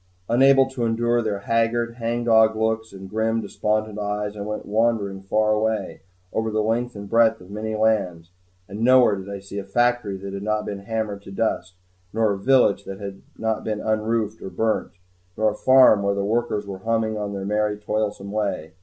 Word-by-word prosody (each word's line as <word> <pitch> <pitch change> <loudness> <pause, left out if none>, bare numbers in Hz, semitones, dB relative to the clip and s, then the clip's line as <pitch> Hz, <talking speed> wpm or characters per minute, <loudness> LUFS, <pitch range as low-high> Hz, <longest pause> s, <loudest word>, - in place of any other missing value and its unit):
Unable 135 +3 +5
to 130 -3 -3
endure 120 +1 +1
their 105 -3 -2
haggard, 115 +2 0
hangdog 115 -1 +3
looks 110 0 -1
and 95 0 -10
grim, 110 +3 0
despondent 110 -1 -2
eyes, 105 0 -3
I 105 - -6
went 105 +1 -4
wandering 105 -3 0
far 105 +2 +1
away, 110 +1 -1 0.3
over 110 0 0
the 110 0 0
length 120 +2 -1
and 100 0 -7
breadth 115 0 +3
of 90 +2 -14
many 110 +1 -4
lands. 100 -6 0 0.4
And 100 +3 -8
nowhere 125 -2 +5
did 95 0 -8
I 100 - -4
see 100 +1 -7
a - - -5
factory 120 0 +1
that 100 +1 -7
had 100 - -5
not 105 +1 -1
been 100 -1 -5
hammered 105 0 -3
to 95 - -12
dust, 95 -3 -2 0.4
nor 110 -1 +2
a 100 - -5
village 120 -4 +3
that 95 0 -7
had 100 -1 -7 0.2
not 110 -1 -1
been 110 -1 -2
unroofed 110 0 -1
or - - -6
burnt, 110 +2 -1 0.5
nor 110 0 +2
a - - -7
farm 130 -5 +6
where 100 0 0
the 100 0 -1
workers 110 -1 -1
went 95 -1 -7
humming 110 -1 0
on 105 -1 -4
their 95 -1 -4
merry, 105 0 0
toilsome 105 -1 -3
way. 100 -7 -2
110 Hz, 195 wpm, -23 LUFS, 100-115 Hz, 0.5 s, farm